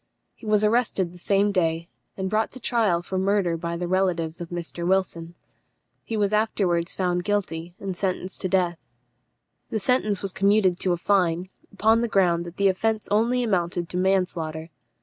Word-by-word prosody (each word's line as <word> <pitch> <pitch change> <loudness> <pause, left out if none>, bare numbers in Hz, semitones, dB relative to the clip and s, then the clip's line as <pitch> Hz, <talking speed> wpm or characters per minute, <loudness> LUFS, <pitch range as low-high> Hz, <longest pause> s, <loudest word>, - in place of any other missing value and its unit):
He 225 - -12
was 210 0 +3
arrested 210 -5 +1
the 180 - -13
same 200 +3 +2
day, 165 -3 0 0.3
and 190 -1 -2
brought 215 +3 +1
to 255 - -9
trial 215 -8 +1
for 185 +1 -3
murder 190 -3 +1
by 170 0 -4
the 175 0 -3
relatives 175 -3 0
of 170 - -6
Mr. 175 0 -5
Wilson. 175 -2 -1 0.7
He 225 - -3
was 205 0 +1
afterwards 190 -5 +1
found 180 -1 0
guilty, 175 -4 -2
and 195 -2 -4
sentenced 185 0 -3
to 185 - -1
death. 175 -2 +1 0.9
The 220 - -1
sentence 210 -2 +1
was 195 - -1
commuted 195 -2 +3
to 185 - +1
a - - -1
fine, 180 -1 +1 0.2
upon 220 +3 +3
the 235 - +1
ground 175 -5 +2
that 170 - -10
the 200 - +3
offence 215 +3 0
only 235 +4 +2
amounted 175 -5 -1
to 180 - -3
manslaughter. 175 -4 -1
185 Hz, 175 wpm, -25 LUFS, 175-205 Hz, 0.9 s, was